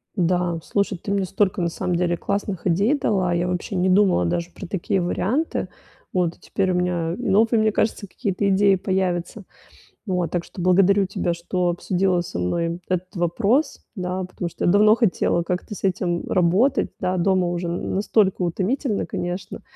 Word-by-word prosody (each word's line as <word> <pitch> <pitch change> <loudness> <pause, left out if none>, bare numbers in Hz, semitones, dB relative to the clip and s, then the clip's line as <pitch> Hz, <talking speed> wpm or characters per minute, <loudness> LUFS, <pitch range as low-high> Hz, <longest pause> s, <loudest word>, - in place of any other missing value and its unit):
Да, 175 -2 +1
слушай, 200 0 -1
ты 195 - -5
мне 200 -1 +1
столько 195 +1 0
на 170 - +1
самом 180 +1 -2
деле 175 0 0
классных 200 0 -3
идей 200 - +3
дала, 190 -9 +1
я 175 +1 0
вообще 180 +2 -3
не 185 +1 +2
думала 185 - +4
даже 170 - -1
про - - -9
такие 190 +1 -1
варианты. 215 - -1 0.4
Вот 175 -2 -1
теперь 190 -1 -1
у - - 0
меня 175 -2 0
новые, 225 +3 +3
мне 215 0 +3
кажется, 210 -1 -1
какие-то 200 0 -1
идеи 195 0 +4
появятся. 185 +1 -2 0.6
Вот 180 -3 -1
так 175 -1 -1
что - - -10
благодарю 195 +2 +4
тебя, 180 -2 -2
что 175 +1 -1
обсудила 180 +1 0
со 170 - -5
мной 170 - -1
этот 185 +2 -2
вопрос, 200 - +1
да, 185 0 -3
потому 180 -1 -5
что - - -5
я - - +4
давно 210 +3 +6
хотела 200 -6 +1
как-то 180 +4 -3
с - - -11
этим 180 -2 0
работать, 195 +10 +2
да, 185 +1 0
дома 185 0 +2
уже 175 0 -2
н 170 - -3
настолько 195 -1 +2
утомительно, 205 - -1
конечно. 180 +2 -5
185 Hz, 175 wpm, -23 LUFS, 175-200 Hz, 0.6 s, давно